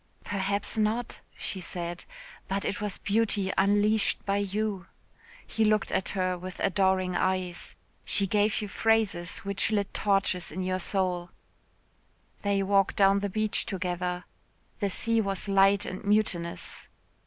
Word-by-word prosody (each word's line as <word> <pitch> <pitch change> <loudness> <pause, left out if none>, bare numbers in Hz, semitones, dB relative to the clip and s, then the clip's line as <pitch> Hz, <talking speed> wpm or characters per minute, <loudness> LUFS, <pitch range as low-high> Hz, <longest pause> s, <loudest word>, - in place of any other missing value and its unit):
"Perhaps 200 +2 -1
not," 220 +3 0 0.2
she 190 - -3
said, 175 0 -5 0.4
"but 195 +1 -2
it 205 - -2
was 210 -2 -2
beauty 205 -2 0
unleashed 205 +2 +2
by 200 0 +1
you." 200 -2 -2 0.6
He 225 - 0
looked 215 -1 +2
at 185 - 0
her 185 -2 -1
with 185 +1 -8
adoring 190 -2 +2
eyes. 185 -1 -1 0.3
She 200 - +1
gave 210 +2 +1
you - - -3
phrases 210 -5 +1
which 200 0 0
lit 205 -2 0
torches 195 -3 +1
in 185 +4 -3
your 185 0 -1
soul. 180 -2 0 1.1
They 200 -1 +1
walked 195 0 +2
down 195 0 +5
the 200 0 -2
beach 215 +2 0
together. 180 -2 -2 0.6
The 200 - 0
sea 230 +4 +1
was 195 -1 -1
light 195 0 +4
and 185 - -6
mutinous. 200 -5 0
195 Hz, 140 wpm, -28 LUFS, 185-205 Hz, 1.1 s, down